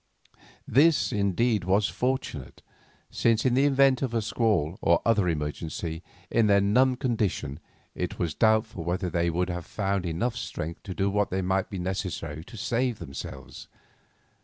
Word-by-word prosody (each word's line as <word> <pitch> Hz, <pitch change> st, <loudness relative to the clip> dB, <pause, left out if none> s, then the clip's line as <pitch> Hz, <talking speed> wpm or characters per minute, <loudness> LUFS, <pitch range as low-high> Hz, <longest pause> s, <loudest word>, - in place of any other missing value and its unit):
This, 150 Hz, +5 st, +4 dB
indeed, 105 Hz, +1 st, +1 dB
was 100 Hz, +3 st, +2 dB
fortunate, 125 Hz, -, -3 dB, 0.5 s
since 115 Hz, 0 st, +2 dB
in 130 Hz, -, +3 dB
the 135 Hz, +3 st, +4 dB
event 135 Hz, -2 st, +4 dB
of 125 Hz, -4 st, -2 dB
a 115 Hz, -, +2 dB
squall 100 Hz, -7 st, 0 dB
or 85 Hz, 0 st, +4 dB
other 105 Hz, -6 st, +3 dB
emergency, 80 Hz, +1 st, -3 dB, 0.3 s
in 115 Hz, -2 st, +3 dB
their 100 Hz, -1 st, +5 dB
numbed 125 Hz, +6 st, +3 dB
condition 105 Hz, -, -1 dB, 0.3 s
it -, -, -4 dB
was 85 Hz, -4 st, -1 dB
doubtful 110 Hz, -3 st, +2 dB
whether 90 Hz, +2 st, -2 dB
they 85 Hz, 0 st, +1 dB
could 90 Hz, +2 st, -1 dB
have 90 Hz, -1 st, -4 dB
found 100 Hz, -3 st, -1 dB
enough 100 Hz, +9 st, -1 dB
strength 85 Hz, +2 st, -5 dB
to 95 Hz, -3 st, -6 dB
do 100 Hz, 0 st, 0 dB
what 105 Hz, 0 st, 0 dB
might 95 Hz, +1 st, 0 dB
be 100 Hz, -, -5 dB
necessary 90 Hz, -4 st, -4 dB
to 115 Hz, -, -11 dB
save 120 Hz, +3 st, 0 dB
themselves. 70 Hz, -3 st, -8 dB
100 Hz, 155 wpm, -27 LUFS, 85-115 Hz, 0.5 s, their